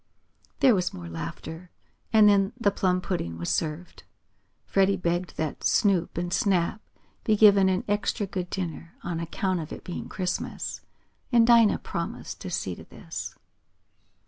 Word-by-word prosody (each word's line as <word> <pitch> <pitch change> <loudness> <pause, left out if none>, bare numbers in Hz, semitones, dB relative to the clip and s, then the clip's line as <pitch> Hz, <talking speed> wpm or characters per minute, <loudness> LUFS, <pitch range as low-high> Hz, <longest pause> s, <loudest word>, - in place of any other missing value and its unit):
There 260 - +7
was 180 -3 0
more 85 -1 -8
laughter, 85 - -7 0.4
and 215 -2 +7
then 200 -1 +4
the 205 -4 +3
plum 185 -2 +1
pudding 85 - -3
was 85 +1 -2
served. 160 +2 -3 0.6
Freddie 195 0 +2
begged 175 -1 -2
that 155 -2 -3
Snoop 185 -6 +2
and 175 0 -2
Snap 195 +1 +1 0.4
be 215 - +3
given 200 -2 +6
an 185 0 0
extra 205 +1 0
good 180 -2 -4
dinner, 170 -2 -5
on 170 -1 -3
account 180 +2 -1
of 155 -1 -6
it - - -8
being 180 - -6
Christmas, 180 -1 -3 0.5
and 235 -2 +6
Dinah 230 -2 +6
promised - - -5
to - - -5
see - - -2
to - - -10
this. - - -7
185 Hz, 150 wpm, -26 LUFS, 170-200 Hz, 0.6 s, There